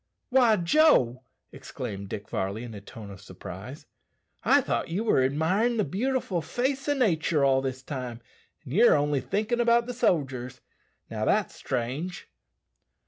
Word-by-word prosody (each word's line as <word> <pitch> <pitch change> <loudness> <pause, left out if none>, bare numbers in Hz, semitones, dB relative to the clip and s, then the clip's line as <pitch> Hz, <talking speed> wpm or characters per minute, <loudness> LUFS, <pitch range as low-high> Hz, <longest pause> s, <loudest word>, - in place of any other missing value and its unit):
"Why, 245 -4 +5
Joe!" 170 - +3 0.3
exclaimed 100 0 -7
Dick 100 - -6
Varley 100 +4 -3
in 120 -2 -8
a 100 - -8
tone 105 0 -10
of 95 0 -11
surprise, - - -9 0.6
"I - - +5
thought - - -1
you 185 +7 -1
were 215 -12 +3
admirin' 170 - +1
the 210 - +2
beautiful 205 - -1
face 265 - -2
o' 290 - +2
nature 165 - +2
all 135 -1 +3
this 130 -1 -4
time, 125 -4 -5 0.4
and 135 -3 -8
ye're 230 +7 +6
only 145 -2 +1
thinkin' 215 - -1
about 235 0 +3
the 245 - -5
sodgers. 130 - -1 0.5
Now, 110 -1 -2
that's 210 - +1
strange!" 135 - -4
155 Hz, 150 wpm, -27 LUFS, -, 0.6 s, ye're